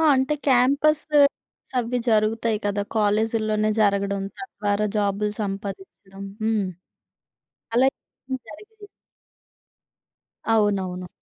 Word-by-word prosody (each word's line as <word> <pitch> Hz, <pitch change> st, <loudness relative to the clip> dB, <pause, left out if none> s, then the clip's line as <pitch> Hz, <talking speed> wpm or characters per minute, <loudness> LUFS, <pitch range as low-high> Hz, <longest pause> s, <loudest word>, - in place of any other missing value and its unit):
అంటే 265 Hz, +3 st, +1 dB
campus 280 Hz, +4 st, +4 dB
placements 285 Hz, -2 st, +1 dB
అవి 245 Hz, +1 st, -1 dB
జరుగుతాయి 220 Hz, 0 st, +2 dB
గదా! 205 Hz, 0 st, 0 dB
కాలేజీల్లోనే 215 Hz, 0 st, +1 dB
జరగడం 200 Hz, -1 st, +1 dB
తద్వారా 210 Hz, -, -2 dB
జాబులు 205 Hz, 0 st, 0 dB
సంపాదిచ్చడం. 195 Hz, -, -6 dB, 0.2 s
హ్మ్. 220 Hz, -2 st, +1 dB, 1.1 s
అలా 250 Hz, +3 st, +5 dB
ఏం 260 Hz, 0 st, -8 dB
జరగలేదా? 420 Hz, -, -13 dB, 1.7 s
అవునవును. 190 Hz, -4 st, 0 dB
215 Hz, 85 wpm, -24 LUFS, 200-250 Hz, 1.7 s, అలా